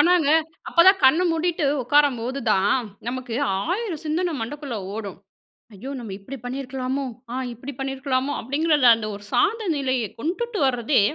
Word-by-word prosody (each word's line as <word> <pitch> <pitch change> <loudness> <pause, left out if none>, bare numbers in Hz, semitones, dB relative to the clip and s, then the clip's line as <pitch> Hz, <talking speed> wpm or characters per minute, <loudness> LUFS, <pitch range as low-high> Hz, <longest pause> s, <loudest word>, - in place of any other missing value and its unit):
ஆனாங்க. 345 -4 +4 0.4
அப்போதான் 375 +3 +6
கண்ண 310 +7 +6
மூடிட்டு 330 0 0 0.2
உட்காரும்போதுதான், 245 -6 +2 0.3
நமக்கு 250 -1 -4 0.2
1000 360 - -2
சிந்தனை 335 +3 0
மண்டக்குள்ள 270 +2 -5 0.2
ஓடும். 205 -4 -6 0.6
"ஐயோ! 225 +7 -8
நம்ம 225 -5 -7
இப்படி 260 +8 -8
பண்ணியிருக்கலாமோ? 265 +1 -3 0.3
ஆ - - -3 0.2
இப்படி 260 +5 -8
பண்ணியிருக்கலாமோ?" 270 0 -1
அப்படிங்கிற 300 +6 +1 0.2
அந்த 220 -1 -5
ஒரு 205 - -11
சாந்த 440 - +2
நிலையை 260 -4 0
கொண்டுட்டு 410 - -2
வர்றதே, 245 0 +2
270 Hz, 130 wpm, -23 LUFS, 245-320 Hz, 0.6 s, அப்போதான்